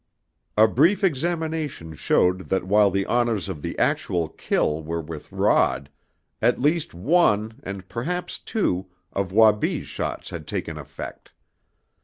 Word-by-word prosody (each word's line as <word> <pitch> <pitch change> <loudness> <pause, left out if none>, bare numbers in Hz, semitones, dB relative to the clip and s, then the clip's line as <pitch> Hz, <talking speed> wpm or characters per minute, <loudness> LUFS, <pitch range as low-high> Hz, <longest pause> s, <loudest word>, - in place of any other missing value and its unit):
A 110 +1 +7
brief 165 - +3
examination 160 - -1
showed 90 +4 +1
that 95 -1 +1
while 100 +2 +4
the 100 +1 0
honors 120 -5 +1
of 85 -6 -5
the - - -5
actual 85 -3 0
kill 75 -1 0
were 85 +2 -3
with 80 -1 -8
Rod, 70 +2 +2 0.5
at - - +3
least 150 - +1
one, 110 - +2
and 100 -5 -7
perhaps 175 - -3
two, 95 - -1 0.3
of 95 -2 -2
Wabi's 105 0 +3
shots - - -4
had - - -7
taken - - -3
effect. - - -9
105 Hz, 135 wpm, -24 LUFS, 90-150 Hz, 0.5 s, A